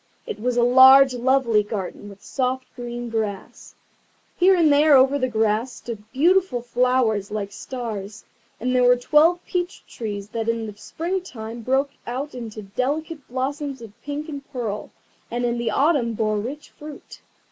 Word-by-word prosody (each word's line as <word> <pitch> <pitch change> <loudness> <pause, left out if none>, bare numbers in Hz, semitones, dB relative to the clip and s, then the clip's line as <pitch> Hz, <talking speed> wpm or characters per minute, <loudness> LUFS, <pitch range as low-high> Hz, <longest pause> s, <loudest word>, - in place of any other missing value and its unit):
It 210 - -6
was 245 +2 -1
a 240 - +4
large 260 +2 +8
lovely 250 -3 +2
garden, 205 -1 -6
with 200 0 -14
soft 260 -1 -2
green 240 0 -5
grass. 210 -4 -4 0.6
Here 375 +1 +5
and 320 -5 +4
there 295 0 +6
over 270 +2 +5
the 255 - +1
grass 220 +1 0
stood 220 -2 -9
beautiful 345 -3 +2
flowers 240 -4 +1
like 205 -1 -4
stars, 215 -5 -6 0.3
and 255 +2 -1
there 250 - +4
were 245 0 +6
twelve 310 +7 +3
peach 355 0 -3
trees 205 -3 -6
that 225 +1 -3
in 230 -1 -1
the 210 -2 -8
spring 340 - -3
time 230 -8 -8
broke 270 +4 +1 0.2
out 265 +5 -4
into 225 -3 -7
delicate 285 - -3
blossoms 270 +2 -3
of 225 -3 -11
pink 295 +2 -5
and 285 -3 -6
pearl, 225 -6 -4 0.4
and 240 +1 -2
in 240 0 -1
the 235 -1 -1
autumn 270 -2 +2
bore 215 -1 0
rich 270 +8 -7
fruit. 295 -1 -11
245 Hz, 165 wpm, -23 LUFS, 220-280 Hz, 0.6 s, large